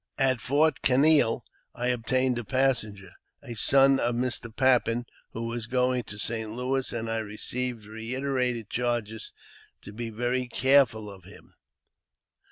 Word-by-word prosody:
At 130 -3 +2
Fort 150 +4 +2
Canaille 135 -2 +4 0.3
I 125 +1 -1
obtained 125 +1 0
a - - -5
passenger, 110 -7 0 0.3
a 125 -4 -7
son 135 +4 +4
of 120 0 0
Mr. 120 -1 -1
Pappen, 120 -1 +2 0.3
who 115 - -4
was 115 -1 -4
going 125 0 +1
to 105 - -9
St. 110 +1 -3
Louis, 130 +3 -1
and 115 -1 -3
I 115 0 -1
received 110 +2 -4
reiterated 125 +1 -2
charges 120 -3 -2 0.5
to 105 - -10
be 115 +1 -5
very 125 +3 -1
careful 125 -4 +3
of 95 -3 -11
him. 100 - -15
120 Hz, 140 wpm, -27 LUFS, 110-130 Hz, 0.5 s, Canaille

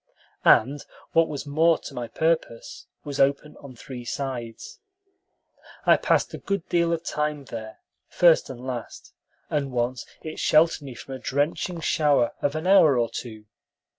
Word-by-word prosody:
and, 140 +2 +4 0.3
what 165 0 +4
was 145 -1 -5
more 160 +3 +3
to - - -10
my 120 -1 -5
purpose, 160 -2 -2 0.2
was 145 -2 -6
open 140 +2 +1
on 135 -3 -12
three 125 +1 -9
sides. 120 -3 -6 1.1
I - - +7
passed - - +1
a - - -6
good 200 -3 -3
deal 170 -1 +2
of 165 -1 -1
time 150 -3 -2
there, 110 -3 -8 0.3
first 170 -2 +4
and 130 -1 -8
last, 125 -3 -7 0.4
and 140 -3 -1
once 120 0 -2 0.2
it 155 - -7
sheltered 160 +1 +3
me 135 -4 -9
from 135 - -9
a 130 - -6
drenching 155 +6 -2
shower 145 -7 +2
of 145 +1 0
an 155 +2 -3
hour 165 -8 +6
or 120 -1 0
two. 110 -3 -7
140 Hz, 160 wpm, -25 LUFS, 125-160 Hz, 1.1 s, I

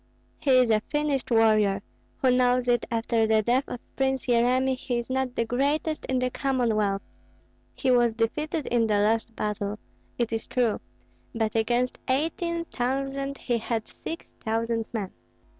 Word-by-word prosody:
"He 285 - -2
is 250 -2 +4
a 215 -1 +3
finished 295 -3 0
warrior; 215 -4 +3 0.4
who 260 - +5
knows 250 0 +3
if 240 -1 +4
after 230 -1 +1
the 220 0 +3
death 250 +5 +2
of 245 - -5 0.2
Prince 265 -1 0
Yeremi 255 +2 +3
he 250 -1 -3
is 235 +2 -4
not 260 -1 -1
the 230 - +1
greatest 285 +6 0
in 260 - 0
the 255 0 0
Commonwealth? 225 -8 0 0.7
He 260 - +1
was 240 -2 +4
defeated 300 +7 -1
in 235 -2 +2
the 210 -1 +2
last 220 +2 +1
battle, 210 0 -2 0.4
it 235 -2 -1
is 225 - -2
true; 240 -4 +1 0.6
but 220 -2 0
against 240 +3 +1
eighteen 335 +5 0
thousand 275 +1 -2
he 240 -2 -1
had 225 0 -2 0.2
six 330 - -6
thousand 225 0 0
men. 205 -5 -3
245 Hz, 160 wpm, -26 LUFS, 225-265 Hz, 0.7 s, who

